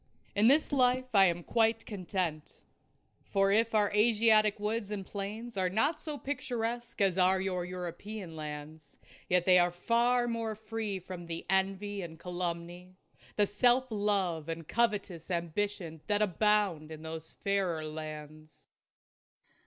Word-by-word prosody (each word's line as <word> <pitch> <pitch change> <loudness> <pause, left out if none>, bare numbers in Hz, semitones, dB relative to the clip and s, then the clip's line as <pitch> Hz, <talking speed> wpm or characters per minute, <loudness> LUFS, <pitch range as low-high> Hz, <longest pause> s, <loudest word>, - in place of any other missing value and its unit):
In 210 +2 +4
this 295 +5 +4
life 255 -2 +2
I 195 -2 +7
am 175 -1 0
quite 225 +2 +1
content; 180 -6 -4 0.6
for 195 -1 +2
if 225 +2 +2
our 205 -1 +3
Asiatic 215 -1 +4
woods 210 0 -2
and 205 -2 -4
plains 215 +4 -6
are 185 -1 +2
not 280 - +1
so 305 -2 -5
pict 285 +1 -4
uresque 235 0 -3
as 190 -2 +3
are 185 +1 +4
your 185 -2 -1
European 180 +1 -6
lands, 150 -1 -8 0.3
yet 180 -1 +3
they 180 -1 +7
are 175 0 +4
far 235 +7 +2
more 230 -2 -2
free 215 -1 -4
from 180 -1 -8
the 165 0 -5
envy 195 +1 0
and 165 -2 -7
calumny, 175 0 -5 0.4
the 205 - +4
self 245 +5 +3
love 195 -7 0
and 165 -1 -5
covetous 205 -8 -1
ambition 170 -1 -2
that 210 0 +2
abound 200 -5 +1
in 155 0 -8
those 160 0 -7
fairer 185 -6 0
lands." 155 0 -9
195 Hz, 145 wpm, -31 LUFS, 170-220 Hz, 0.6 s, I